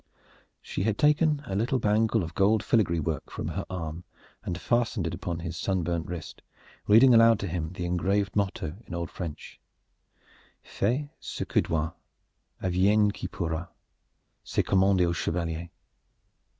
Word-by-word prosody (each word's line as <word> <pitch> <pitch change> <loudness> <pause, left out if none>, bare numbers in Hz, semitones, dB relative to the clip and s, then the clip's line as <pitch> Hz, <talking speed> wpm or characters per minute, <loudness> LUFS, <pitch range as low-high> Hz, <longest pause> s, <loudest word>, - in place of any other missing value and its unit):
She - - -4
had 105 +1 0
taken 150 0 +3
a 95 - -4
little 120 +7 +1
bangle 110 -1 +2
of 80 0 -6
gold 105 +3 +3
filigree 105 -7 +2
work 80 0 -3
from - - -4
her - - -4
arm 85 -2 -5 0.4
and 90 0 -4
fastened 120 -5 0
it 85 - -2
upon 85 -1 -4
his 85 0 -5
sunburnt 85 -2 -1
wrist, 85 -2 -7 0.5
reading 120 +5 +7
aloud 115 -1 +7
to 100 - -2
him 85 -1 -3
the 90 -1 -4
engraved 95 +3 0
motto 95 -5 -1
in 85 - -6
old 85 -1 -4
French: 85 -5 -7 1.0
"Fais 125 +9 -1
ce - - -5
que - - +3
dois, 80 0 -1 0.7
adviegne 100 +3 +3
que - - -6
pourra 85 -2 -3 0.8
c'est - - 0
commande 95 -1 +3
au 85 -1 +1
chevalier." 85 0 -2
95 Hz, 150 wpm, -27 LUFS, 85-110 Hz, 1.0 s, reading